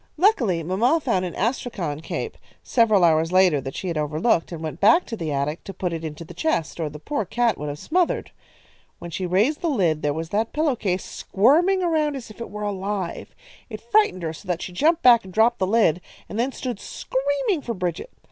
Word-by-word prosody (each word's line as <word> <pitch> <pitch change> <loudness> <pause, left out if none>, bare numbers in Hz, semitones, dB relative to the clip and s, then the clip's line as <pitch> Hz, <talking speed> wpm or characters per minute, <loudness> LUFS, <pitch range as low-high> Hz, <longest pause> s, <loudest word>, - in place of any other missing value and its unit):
"Luckily, 245 - +3
mamma 225 - +2
found 210 -11 0
an 175 - -6
astrakhan 200 - -2
cape, 440 - -4 0.3
several 215 -6 +3
hours 165 0 +3
later, 185 -6 +4
that 135 0 -7
she 190 - -4
had 165 -3 -1
overlooked, 160 +5 +1
and 165 -2 -6
went 155 0 -5
back 225 - +5
to 230 - -5
the 165 -7 -4
attic 145 +3 -2
to 195 - -8
put 180 -2 -2
it 165 -1 -5
into 160 +1 -6
the 175 - -11
chest, 175 - -1
or 160 -2 -1
the 150 - -9
poor 285 - -2
cat 235 +1 +1
would 150 0 -4
have 145 - -5
smothered. 345 - 0 0.7
When 170 - -9
she 180 +3 -3
raised 210 - +2
the 340 - 0
lid 175 - +1
there 145 - +1
was 160 +2 -4
that 220 +4 -1
pillow 300 -3 +1
case 190 -5 -2
squirming 335 - +2
around 310 -4 +1
as 245 -5 -8
if 215 - -13
it - - -5
were 210 +1 -6
alive. 200 -2 -4 0.3
It 215 -2 -6
frightened 235 - +2
her 160 -1 -2
so 170 - -13
that 180 -1 -2
she 180 - -7
jumped 320 - +2
back 240 -2 +7
and 190 - -11
dropped 225 +4 +3
the 185 - +1
lid, 195 -6 +3 0.3
and 210 - -5
then 255 +3 +1
stood 250 -5 -5
screaming 285 +5 -1
for 235 -4 -4
Bridget. 180 - -3
200 Hz, 220 wpm, -23 LUFS, 165-255 Hz, 0.7 s, back